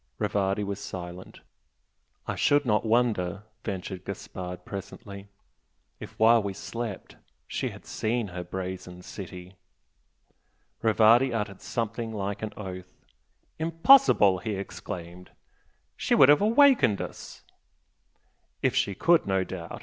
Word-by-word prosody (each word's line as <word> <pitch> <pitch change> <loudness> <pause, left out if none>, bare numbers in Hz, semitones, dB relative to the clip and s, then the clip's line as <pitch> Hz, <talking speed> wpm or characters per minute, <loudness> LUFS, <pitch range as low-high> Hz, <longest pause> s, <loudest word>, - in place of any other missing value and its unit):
Rivardi 100 +1 0
was 100 0 -4
silent. 90 -2 -8 0.8
"I - - -2
should 145 0 +2
not 105 -3 +2
wonder," 110 -5 +1 0.2
ventured 95 -1 -5
Gaspard, 90 -2 -7
presently 100 0 -8 0.7
"if - - -10
while 115 +1 +6
we 100 -1 -4
slept 115 0 -6 0.3
she - - -2
had - - -12
seen 110 -1 -2
her 90 0 -6
'Brazen 90 0 -6
City'!" 90 -1 -9 1.2
Rivardi 115 +3 +5
uttered 105 -4 -3
something 115 0 -3
like 100 -1 -4
an 110 -1 -4
oath. 95 -2 -7 0.7
"Impossible!" 165 - +5
he 105 +2 -3
exclaimed 90 -2 -7 0.7
"She - - +1
would 135 - +7
have 145 +4 +6
awakened 230 - +5
us!" - - -8 1.2
"If - - +2
she 100 - +1
could, 170 - +3
no 95 -1 +1
doubt!" 90 -2 -7
100 Hz, 120 wpm, -27 LUFS, 95-115 Hz, 1.2 s, would